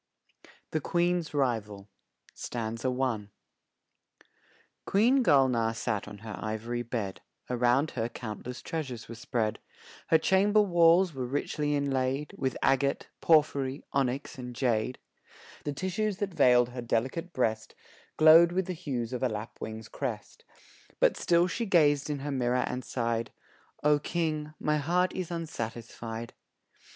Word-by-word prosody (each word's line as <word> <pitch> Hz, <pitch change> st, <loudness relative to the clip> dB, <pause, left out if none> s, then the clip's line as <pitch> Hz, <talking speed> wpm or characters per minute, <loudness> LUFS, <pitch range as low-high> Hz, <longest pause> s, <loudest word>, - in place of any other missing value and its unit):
THE 155 Hz, -, -1 dB
QUEEN'S 175 Hz, +1 st, 0 dB
RIVAL 110 Hz, -8 st, -1 dB, 3.0 s
QUEEN 245 Hz, +7 st, +4 dB
Gulnaar 125 Hz, -, +3 dB
sat 110 Hz, -3 st, -2 dB
on 105 Hz, 0 st, -9 dB
her 110 Hz, +1 st, -8 dB
ivory 110 Hz, +3 st, -3 dB
bed, 115 Hz, -5 st, -4 dB, 0.3 s
Around 125 Hz, +4 st, +2 dB
her 115 Hz, -1 st, -2 dB
countless 120 Hz, +1 st, -7 dB
treasures 135 Hz, -8 st, -5 dB
were 115 Hz, -, -7 dB
spread; 110 Hz, -1 st, -2 dB, 0.5 s
Her 160 Hz, -, +6 dB
chamber 195 Hz, +6 st, +3 dB
walls 175 Hz, -2 st, +5 dB
were 130 Hz, -2 st, -3 dB
richly 145 Hz, +2 st, -1 dB
inlaid 135 Hz, 0 st, -1 dB
With 130 Hz, -1 st, -2 dB
agate, 135 Hz, +1 st, +1 dB
porphory, 140 Hz, -4 st, +2 dB
onyx 135 Hz, 0 st, -1 dB
and 125 Hz, -1 st, -7 dB
jade; 120 Hz, -1 st, 0 dB, 0.7 s
The 145 Hz, -, -2 dB
tissues 190 Hz, +5 st, -2 dB
that 200 Hz, -2 st, -3 dB
veiled 125 Hz, -4 st, +5 dB
her 125 Hz, 0 st, -6 dB
delicate 130 Hz, +9 st, -1 dB
breast, 110 Hz, -6 st, -1 dB, 0.4 s
Glowed 160 Hz, +2 st, +8 dB
with 190 Hz, 0 st, 0 dB
the 185 Hz, -, -3 dB
hues 130 Hz, -8 st, -4 dB
of 125 Hz, -, -3 dB
a 130 Hz, -, +2 dB
lapwing's 110 Hz, 0 st, -6 dB
crest; 115 Hz, -7 st, -5 dB, 0.6 s
But -, -, +4 dB
still 170 Hz, 0 st, +3 dB
she 225 Hz, +5 st, -2 dB
gazed 150 Hz, -6 st, +3 dB
in 145 Hz, -2 st, -2 dB
her 145 Hz, -, -2 dB
mirror 125 Hz, -1 st, +1 dB
and 125 Hz, 0 st, -4 dB
sighed 115 Hz, -2 st, -2 dB, 0.5 s
"O 150 Hz, 0 st, +4 dB
King, 155 Hz, -1 st, -2 dB
my 150 Hz, 0 st, +1 dB
heart 175 Hz, +5 st, +1 dB
is 185 Hz, -3 st, -4 dB
unsatisfied." 115 Hz, -7 st, -5 dB
135 Hz, 130 wpm, -29 LUFS, 120-165 Hz, 3.0 s, Glowed